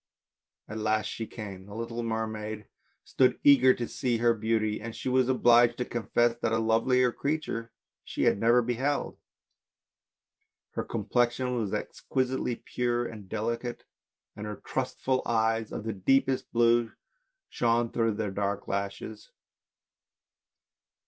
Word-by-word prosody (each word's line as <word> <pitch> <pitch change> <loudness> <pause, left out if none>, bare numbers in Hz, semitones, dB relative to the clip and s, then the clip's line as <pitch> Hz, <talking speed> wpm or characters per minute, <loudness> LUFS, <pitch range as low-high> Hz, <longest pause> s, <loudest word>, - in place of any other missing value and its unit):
At 110 +1 -6
last 110 0 +1
she 115 - -4
came. 100 -4 -8
The 100 - -10
little 115 +1 -4
mermaid 110 -2 -3 0.4
stood 130 -1 +2
eager 135 -2 +7
to 120 - -3
see 120 -3 -1
her 120 +1 +3
beauty, 110 -1 0
and 115 +1 -6
she - - -3
was 130 0 +3
obliged 120 -2 +5
to 125 - -1
confess 120 +1 +1
that 110 - 0
a 115 - +2
lovelier 115 +3 +3
creature 140 -5 -3 0.3
she - - -3
had - - +3
never 120 +2 +4
beheld. 130 +5 -1 1.5
Her - - -3
complexion 120 +3 0
was 110 -5 -2
exquisitely 130 -2 -2
pure 120 0 -1
and 105 -5 -9
delicate, 115 +2 -3 0.5
and 105 0 -6
her 105 - -4
trustful 130 +3 -2
eyes 110 -1 0
of - - -5
the 110 0 -3
deepest 135 +7 +1
blue 120 0 +3 0.5
shone 120 0 +1
through 115 -1 +1
their 105 -2 -2
dark 100 0 -2
lashes. 100 +2 -4
115 Hz, 135 wpm, -28 LUFS, 110-125 Hz, 1.5 s, eager